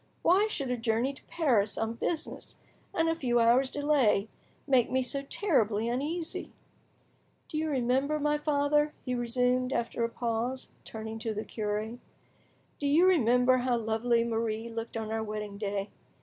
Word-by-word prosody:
Why 390 +5 +4
should 275 -11 -3
a 250 - 0
journey 230 +3 0
to - - -16
Paris 235 -11 +1
on 225 0 -1
business, 315 +7 -4 0.4
and 325 -3 +1
a 325 - +3
few 250 -7 +1
hours' 240 +3 +4
delay, 275 -9 +2 0.4
make, 260 -4 +3
me 260 +1 +1
so 275 +2 -2
terribly 230 - +1
uneasy? 310 +7 -3 1.0
Do 310 - -3
you 315 0 -1
remember, 270 +2 +1
my 295 0 +1
father," 295 0 +1
he 250 - -1
resumed, 250 +1 +1
after 235 -1 -1
a 230 - +1
pause, 235 +2 -3
turning 220 0 -6
to 220 -1 -3
the 215 - -4
cure, 215 +2 -3 0.8
"do 285 - -1
you 315 +6 +5
remember 255 -7 +4
how 250 -1 +1
lovely 230 +1 +1
Marie 225 0 -2
looked 230 0 -5
on 220 -1 -4
our 225 0 -1
wedding 210 -2 -5
day? 200 -1 -2
245 Hz, 160 wpm, -29 LUFS, 225-285 Hz, 1.0 s, you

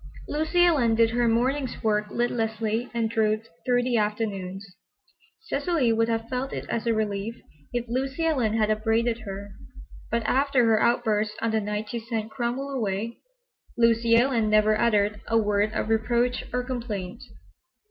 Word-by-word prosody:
Lucy 315 +4 +2
Ellen 260 -10 +3
did 225 0 +3
her 240 0 +1
mornings' 255 +3 0
work 210 -1 +1
listlessly 225 0 -1
and 235 -1 0
drooped 220 0 0 0.2
through 245 -1 +2
the 245 -1 +1
afternoons. 205 -3 -2 0.8
Cecily 295 - 0
would 225 +1 +1
have 225 0 -1
felt 255 +2 -3
it - - -5
as 235 +1 -2
a 230 - +3
relief 215 +1 -2 0.4
if 240 -1 -2
Lucy 270 +6 -2
Ellen 255 -10 +1
had 215 -1 +2
upbraided 225 +2 +1
her, 200 +1 -6 0.6
but 235 0 0
after 270 0 +2
her 220 -1 +3
outburst 220 -3 +1
on 230 0 0
the 220 0 +1
night 210 +1 -3
she 235 - -3
sent 225 -1 -4
Cromwell 265 +2 -3
away, 225 -2 -2 0.6
Lucy 230 0 +4
Ellen 235 -3 +3
never 215 0 +4
uttered 210 -2 +1
a 225 - +2
word 210 -1 +2
of - - -1
reproach 235 +2 +1
or 250 0 -1
complaint. 235 -5 -5
230 Hz, 160 wpm, -26 LUFS, 215-245 Hz, 0.8 s, Lucy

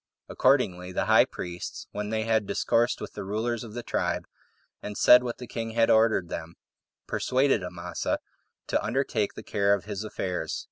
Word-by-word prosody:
Accordingly 95 -10 +2
the - - -1
high - - +6
priests, 90 0 -6
when 105 0 -4
they 110 0 0
had 110 -2 +1
discoursed 120 +1 +1
with - - -6
the - - -6
rulers 110 +4 -2
of 110 -1 -10
the 120 - -4
tribe, - - -1 0.6
and 105 0 -6
said 125 0 +8
what 120 -1 -4
the 125 - -8
king 115 -2 -5
had 115 0 +4
ordered 110 -5 +4
them, 85 0 -6 0.5
persuaded 130 -3 +1
Amasa 90 -1 -3 0.5
to - - 0
undertake 115 -2 -1
the - - -8
care 100 0 +2
of 100 - -8
his 105 -1 -4
affairs. 90 -6 -3
110 Hz, 175 wpm, -27 LUFS, 95-120 Hz, 0.6 s, said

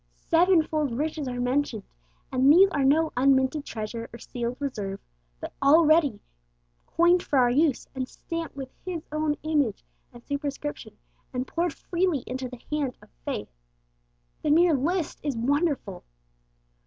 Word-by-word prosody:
Seven 340 0 +4
fold 300 -6 -2
riches 305 -1 -2
are 245 -1 -4
mentioned; 250 -3 0 0.5
and 260 +2 +5
these 370 +5 +8
are 280 - 0
no 310 +4 +3
unminted 265 +2 +3
treasure 230 +1 -5
or 235 - -9
sealed 240 +1 -5
reserve, 210 -9 -4 0.4
but - - -7
all 305 +4 +6
ready 300 -8 +4 0.7
coined 345 +1 +4
for 285 - -1
our 245 -2 +4
use, 290 +1 +2
and 260 -2 -3
stamped 330 -3 -6
with 265 -2 -7
His 345 -3 -4
own 305 -1 0
image 290 -9 0 0.3
and 240 -1 -14
superscription, 285 0 -5 0.4
and 250 0 -2
poured 340 +3 -1
freely 345 -6 -1
into 255 0 -4
the 250 -1 -11
hand 285 -4 -1
of - - -20
faith. - - -4 0.9
The 300 - -1
mere 335 +2 +5
list 320 +5 -1
is 285 -5 -2
wonderful. 275 - 0
285 Hz, 150 wpm, -26 LUFS, 250-315 Hz, 0.9 s, these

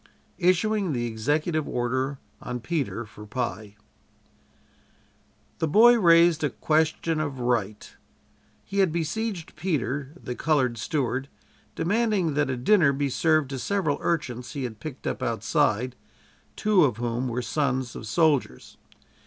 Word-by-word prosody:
ISSUING 185 0 +2
THE 120 -2 -1
EXECUTIVE 150 +8 -1
ORDER 130 +3 -1 0.2
ON 125 0 -4
PETER 130 -3 -3
FOR 105 0 -13
PIE 110 -3 -4 1.8
The 160 - +1
boy 235 +9 +6
raised 170 -3 +5
a 145 - +2
question 160 +1 0
of 145 -4 -3
right. 115 -4 -2 0.7
He 200 - -3
had 190 -4 +4
besieged 170 +3 -3
Peter, 145 -5 -2
the 125 - -5
colored 130 -5 +1
steward, 135 -2 -2 0.5
demanding 205 -3 +1
that 150 -1 +1
a 130 - -1
dinner 155 +3 +4
be 140 0 -1
served 155 0 +2
to 135 - -4
several 175 -4 0
urchins 125 -8 -2
he 140 - -4
had 110 -4 -5
picked 140 +1 -8
up - - -3
outside 125 +4 0 0.6
two 210 -4 +3
of 125 -7 +1
whom 120 +1 -2
were 125 +1 -2
sons 130 -1 -1
of 110 - -7
soldiers. 135 - 0
145 Hz, 135 wpm, -26 LUFS, 125-165 Hz, 1.8 s, boy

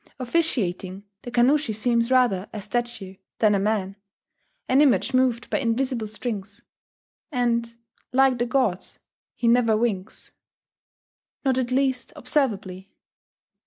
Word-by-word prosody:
Officiating, 215 - -1 0.2
the - - -8
Kannushi 245 0 +2
seems 235 +1 +1
rather 245 -7 +2
a 215 - -6
statue 210 -3 -4 0.2
than 215 -2 +3
a 200 - +2
man, 195 -1 -1 0.7
an 265 +3 +4
image 235 -7 +3
moved 255 -2 +1
by - - +1
invisible 240 -2 -1
strings; 210 -2 -6 0.7
and, 235 -3 0 0.4
like 260 -1 +3
the 240 - 0
gods, 235 -8 -1 0.4
he 235 - -1
never 230 -2 +4
winks. 215 -4 -3 1.1
Not 260 -1 +2
at 245 -2 -1
least 260 -2 0
observably.... 200 -8 -1
235 Hz, 120 wpm, -24 LUFS, 205-255 Hz, 1.1 s, an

